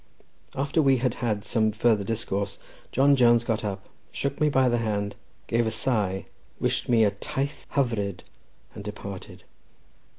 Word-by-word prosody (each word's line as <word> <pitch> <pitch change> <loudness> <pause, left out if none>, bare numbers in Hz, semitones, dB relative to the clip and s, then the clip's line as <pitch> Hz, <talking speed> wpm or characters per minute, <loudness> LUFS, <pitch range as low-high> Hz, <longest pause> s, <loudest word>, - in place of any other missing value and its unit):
After 140 +4 +1
we 135 -3 +4
had 125 -1 0
had 105 -4 -1
some 110 0 +2
further 110 -1 +2
discourse, 100 -2 -2 0.3
John 140 +2 +5
Jones 120 -2 +5
got 115 -1 -1
up, 95 -2 -4 0.2
shook 140 +1 -3
me 150 - +5
by 130 -2 +3
the 120 -1 +2
hand, 100 -2 -1 0.3
gave 115 0 +1
a - - +2
sigh, 105 -5 0 0.3
wished - - -1
me 115 -2 +5
a 105 - +4
"taith 135 +8 -4
hyfryd," 105 -9 0 0.5
and - - -8
departed. 100 -2 -8
115 Hz, 155 wpm, -26 LUFS, 100-130 Hz, 0.5 s, John